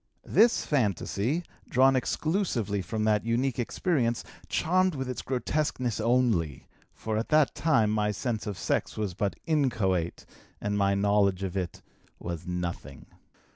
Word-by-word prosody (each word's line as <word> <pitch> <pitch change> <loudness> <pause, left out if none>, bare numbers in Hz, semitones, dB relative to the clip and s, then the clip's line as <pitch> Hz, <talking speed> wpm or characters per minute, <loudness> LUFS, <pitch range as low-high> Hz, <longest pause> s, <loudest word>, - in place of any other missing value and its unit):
This 235 +2 +4
fantasy, 125 - 0 0.3
drawn 130 +1 +5
exclusively 130 - 0
from 110 +5 -3
that 105 -1 +2
unique 120 +3 0
experience, 120 -2 0 0.3
charmed 185 +1 +2
with 130 -1 -3
its 125 - -4
grotesqueness 130 -3 -1
only, 110 - +1 0.3
for 110 -1 -3
at 115 - -4
that 155 -2 +4
time 115 -10 +2
my 105 -1 +1
sense 110 +1 -3
of 100 -3 -4
sex - - -1
was 105 -4 -2
but 100 -1 -1
inchoate 110 - 0 0.3
and 105 0 -2
my 100 -1 +2
knowledge 100 -1 +2
of 95 -1 -3
it 90 -4 -4 0.3
was 85 -1 -6
nothing. 90 -1 -5
110 Hz, 135 wpm, -28 LUFS, 100-130 Hz, 0.3 s, drawn